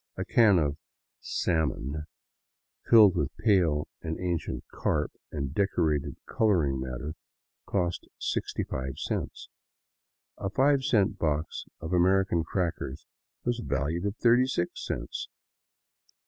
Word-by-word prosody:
A - - -2
can 110 -5 +5
of 75 -3 +1 0.4
'' - - -65 0.2
salmon,'* 75 -2 -1 0.8
filled 105 -5 +8
with 90 - -2
pale 90 -9 +3
and 80 0 -4
ancient 90 -2 -2
carp - - 0 0.2
and 70 -3 -3
deteriorated 75 -7 +1
coloring 85 -12 +2
matter, 65 +4 -4 0.5
cost 90 -3 -1
65 65 0 -3
cents; - - -4 0.9
a 95 - -2
five 135 +4 +3
cent 105 -7 +2
box 75 0 -1
of 80 - -6
Ameri 95 +2 +4
can 85 -4 +1
crackers 80 -5 -3 0.4
was 120 0 0
valued 75 +7 -1
at 100 - -3
36 120 -6 +3
cents - - -4
85 Hz, 115 wpm, -28 LUFS, 75-100 Hz, 0.9 s, filled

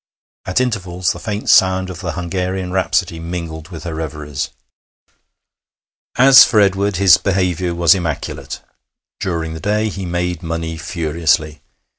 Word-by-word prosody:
At 95 - +1
intervals 95 -8 -1
the - - -6
faint 105 -1 -5
sound 95 -1 +4
of 85 - -9
the 95 - -4
Hungarian 90 +1 -3
Rhapsody 95 -2 0
mingled 85 -2 -6
with 80 -4 -9
her 85 - -5
reveries. 75 -3 -5 1.7
As 130 +1 +9
for 120 -3 +2
Edward, 100 0 +2
his 95 -2 +6
behaviour 90 -3 -1
was 85 -1 +5
immaculate. 85 -6 -4 0.6
During 80 -3 -3
the 80 - -7
day 105 +4 0
he 95 -2 -6
made 85 -1 -2
money 80 -1 -4
furiously. 80 -2 -1
90 Hz, 135 wpm, -18 LUFS, 80-95 Hz, 1.7 s, As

